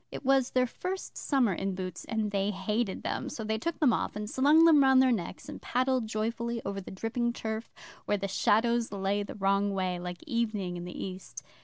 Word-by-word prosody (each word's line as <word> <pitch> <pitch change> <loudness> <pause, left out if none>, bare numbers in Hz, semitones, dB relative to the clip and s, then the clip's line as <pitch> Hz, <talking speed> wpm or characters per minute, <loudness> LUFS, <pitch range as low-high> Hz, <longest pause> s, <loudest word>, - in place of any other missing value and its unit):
It - - -7
was 270 -1 +3
their 255 0 +2
first 370 +9 -5
summer 255 -8 +1
in 195 +2 -2
boots, 185 -2 -5
and 220 -2 -1
they 200 0 0
hated 210 +1 -2
them, - - -2
so 225 - -5
they 220 0 -1
took 335 +7 -3
them 270 -7 +4
off, - - -2
and 210 0 -4
slung 290 +8 +5
them 315 -3 +7
round 265 -1 +6
their 260 -1 +5
necks, 190 -5 -3
and - - -8
paddled 255 -1 0
joyfully 230 +2 -2
over 195 0 -3
the - - -10
dripping 235 +4 -2
turf 220 0 -4 0.3
where 205 - +1
the 195 0 -3
shadows 230 +4 +2
lay 200 +1 0
the 205 - -6
wrong 200 0 +1
way, 185 -2 -1
like 180 0 -6
evening 220 - -1
in 175 0 -6
the 180 - -5
East. 185 0 -8
220 Hz, 210 wpm, -29 LUFS, 195-245 Hz, 0.3 s, them